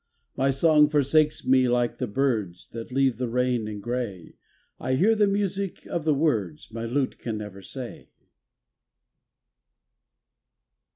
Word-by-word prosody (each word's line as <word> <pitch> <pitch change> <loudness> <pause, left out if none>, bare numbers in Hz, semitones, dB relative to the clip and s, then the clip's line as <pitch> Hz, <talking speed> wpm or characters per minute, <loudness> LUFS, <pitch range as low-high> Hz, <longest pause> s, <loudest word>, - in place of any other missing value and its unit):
My 135 +1 +2
song 150 +2 +4
forsakes 150 +1 +2
me 130 -1 +4
like 120 -1 0
the 125 - -1
birds 105 -7 -1
That 115 +1 -8
leave 135 -3 +2
the 125 0 -2
rain 125 -2 0
and 105 -2 -6
grey, 120 -8 -4 0.5
I 130 - 0
hear 200 +11 +4
the 210 -2 +3
music 200 -1 -2
of 170 -3 -3
the 155 -2 +3
words 110 - -1
My 115 +1 -5
lute 130 +3 -1
can 115 -2 -4
never 105 -2 -8
say. 125 +4 -8
130 Hz, 135 wpm, -26 LUFS, 115-150 Hz, 0.5 s, song